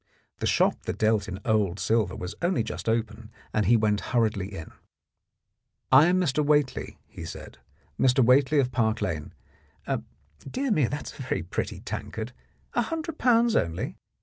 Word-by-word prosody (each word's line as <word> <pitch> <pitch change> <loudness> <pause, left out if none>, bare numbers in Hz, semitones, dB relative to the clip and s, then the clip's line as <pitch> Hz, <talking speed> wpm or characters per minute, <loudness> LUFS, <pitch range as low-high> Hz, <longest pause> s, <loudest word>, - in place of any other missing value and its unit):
The - - -1
shop - - +2
that - - -3
dealt 110 -2 +2
in 95 0 -5
old 105 -4 +1
silver 110 -5 +1
was 90 +2 -5
only 175 -9 +1
just 110 0 -4
open, 110 -1 -2 0.2
and 105 -3 +1
he 115 +2 +6
went 105 -2 +1
hurriedly 110 -6 0
in. 95 -6 -8 1.2
"I 135 +5 +8
am 180 +1 +3
Mr. 150 -4 +1
Whately," 145 -2 +1
he - - -10
said, 65 - -9 0.4
"Mr. 130 -1 +4
Whately, 135 +4 +4
of 130 -3 +2
Park 110 -3 +1
Lane. 80 -6 -3 1.1
Dear 260 - -3
me, 150 - +3
that 145 +3 -5
is - - -16
a - - -5
very 130 -9 -2
pretty 90 - -4
tankard. 110 +2 -5 0.4
A 240 - +2
hundred 325 +5 -4
pounds 235 -2 +4
only 95 - -1
115 Hz, 165 wpm, -27 LUFS, 105-145 Hz, 1.2 s, I